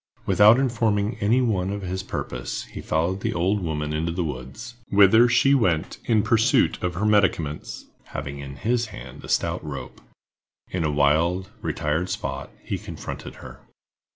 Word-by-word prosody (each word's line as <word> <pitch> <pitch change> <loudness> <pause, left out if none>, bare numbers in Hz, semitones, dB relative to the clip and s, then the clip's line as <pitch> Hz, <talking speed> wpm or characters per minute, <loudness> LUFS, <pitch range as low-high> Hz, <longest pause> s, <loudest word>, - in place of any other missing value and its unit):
Without 105 +3 +6
informing 115 -4 +1
any 110 +5 +3
one 95 -6 0
of 100 0 -4
his 95 +1 -3
purpose, 65 -9 -5
he - - -9
followed 85 +5 0
the - - -2
old 95 +4 +1
woman 75 -3 -2
into 80 +2 -1
the 85 +1 -2
woods—whither 105 - +2
she 135 +3 +4
went 90 - +1
in 110 -3 +3
pursuit 115 +3 +3
of 90 -2 -2
her 100 +4 -1
medicaments—having 75 -7 -1
in 70 -1 -8
his 115 +7 0
hands 65 - -10
a - - -9
stout - - 0
rope. 70 -3 -7 0.7
In 90 -2 -1
a 80 - +1
wild, 80 +6 +2
retired 80 +5 -1
spot, 70 -8 -4
he - - -3
confronted - - -7
her. - - -11
95 Hz, 155 wpm, -24 LUFS, 75-110 Hz, 0.7 s, Without